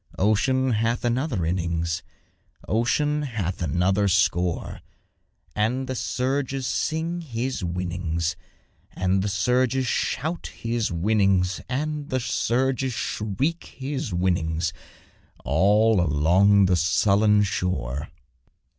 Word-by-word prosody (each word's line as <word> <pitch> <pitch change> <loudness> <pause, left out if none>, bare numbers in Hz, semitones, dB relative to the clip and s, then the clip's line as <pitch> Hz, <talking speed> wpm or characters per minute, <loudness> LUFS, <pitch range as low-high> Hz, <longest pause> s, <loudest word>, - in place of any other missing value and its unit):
Ocean 130 +6 +2
hath 115 +2 0
another 120 - 0
innings, 85 -1 -1 0.7
Ocean 145 +7 +1
hath 105 - -3
another 90 +5 +1
score; 90 -2 0 0.7
And 120 +5 0
the 130 - -3
surges 130 +1 -2
sing 165 +6 -1
his 125 - -3
winnings, 85 -1 -2 0.6
And 95 +1 +1
the 100 - -1
surges 125 +5 +1
shout 160 +7 -2
his 115 -2 -2
winnings, 95 0 +1
And 150 +2 -3
the 130 - 0
surges 130 +2 0
shriek 130 - -3
his 135 -4 -4
winnings, 85 -2 0 0.7
All 105 +6 +4
along 90 +7 +4
the 90 -1 +3
sullen 100 +4 +3
shore. 75 -8 -2
105 Hz, 100 wpm, -24 LUFS, 90-130 Hz, 0.7 s, All